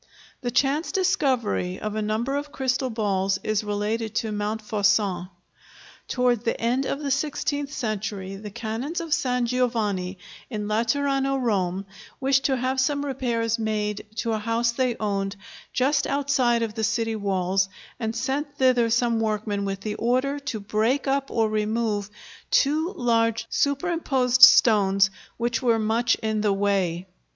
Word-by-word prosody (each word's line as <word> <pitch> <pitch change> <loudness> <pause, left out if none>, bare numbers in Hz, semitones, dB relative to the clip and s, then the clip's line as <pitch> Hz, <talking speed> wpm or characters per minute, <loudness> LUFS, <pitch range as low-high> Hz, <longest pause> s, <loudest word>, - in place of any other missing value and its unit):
The 245 - -2
chance 275 +6 +1
discovery 265 - 0
of 215 -1 -4
a 215 - -2
number 220 +6 -1
of 290 +1 -4
crystal 260 0 -1
balls 195 -4 0
is 215 -1 0
related 215 +2 -1
by 220 - -3
Montfaucon. 210 -3 0 0.8
Towards 245 -3 +1
the 230 - -1
end 250 +4 0
of 275 - -3
the 280 -2 -2
sixteenth 285 0 -1
century, 210 -6 -3
the 210 +2 -8
canons 230 - -4
of 330 -3 -2
San 250 -3 +1
Giovanni 220 -7 -1 0.3
in 210 -4 -4
Laterano, 270 +5 +1
Rome, 195 -6 0 0.3
wished 270 0 +2
to 265 -2 +2
have 260 +2 -1
some 285 +2 +1
repairs 235 -4 -1
made 210 -1 -2
to 230 0 -1
a 215 - -1
house 230 +2 0
they 250 0 0
owned, 200 -2 -1 0.4
just 285 +4 +1
outside 265 -4 +1
of 220 -2 -3
the 220 0 -3
city 225 0 0
walls, 190 -2 0 0.3
and 225 -1 -2
sent 280 +4 -2
thither 250 -3 +3
some 235 0 +2
workmen 210 -2 -1
with 195 0 -3
the 210 +1 -3
order 255 +6 0
to 280 -6 -4
break 215 +7 0
up 275 0 0
or 225 -1 +1
remove 215 -1 -1 0.4
two 315 - +2
large, 230 -2 +1
superimposed 280 -4 +1
stones, 195 -3 +7 0.3
which 235 0 -1
were 235 -3 +3
much 225 +2 +2
in 220 -1 0
the 210 -2 +2
way. 195 -3 0
230 Hz, 150 wpm, -25 LUFS, 210-260 Hz, 0.8 s, stones